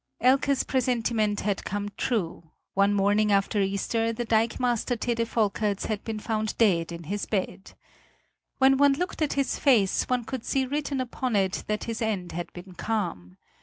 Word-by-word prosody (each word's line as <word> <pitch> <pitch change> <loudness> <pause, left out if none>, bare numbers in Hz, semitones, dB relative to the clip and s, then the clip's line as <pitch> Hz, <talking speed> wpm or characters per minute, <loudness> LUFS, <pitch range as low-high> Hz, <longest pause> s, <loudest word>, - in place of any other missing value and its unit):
Elke's 270 +2 +3
presentiment 230 -5 0
had 200 -1 -1
come 205 +1 -3
true; 170 -8 -2 0.2
one 200 +1 +3
morning 205 +1 +2
after 200 +1 +2
Easter 200 +4 0
the 240 +1 -3
dikemaster 235 +2 +1
Tede 230 0 0
Volkerts 210 -2 0
had 215 -2 -3
been 225 -1 -4
found 215 0 -2
dead 175 -7 +3
in 170 0 -7
his 200 +6 -3
bed. 195 -1 -3 0.8
When 265 0 +5
one 285 0 +5
looked 355 +4 -3
at 305 - +1
his 275 -1 -1
face, 225 -9 +3
one 250 -1 +1
could 255 0 -5
see 270 -1 0
written 280 0 -2
upon 250 -1 -2
it 190 -1 0
that 210 0 -1
his 230 -1 -4
end 200 -6 -2
had 175 +1 -5
been 180 +1 -10
calm. 170 - -3
220 Hz, 165 wpm, -27 LUFS, 200-245 Hz, 0.8 s, When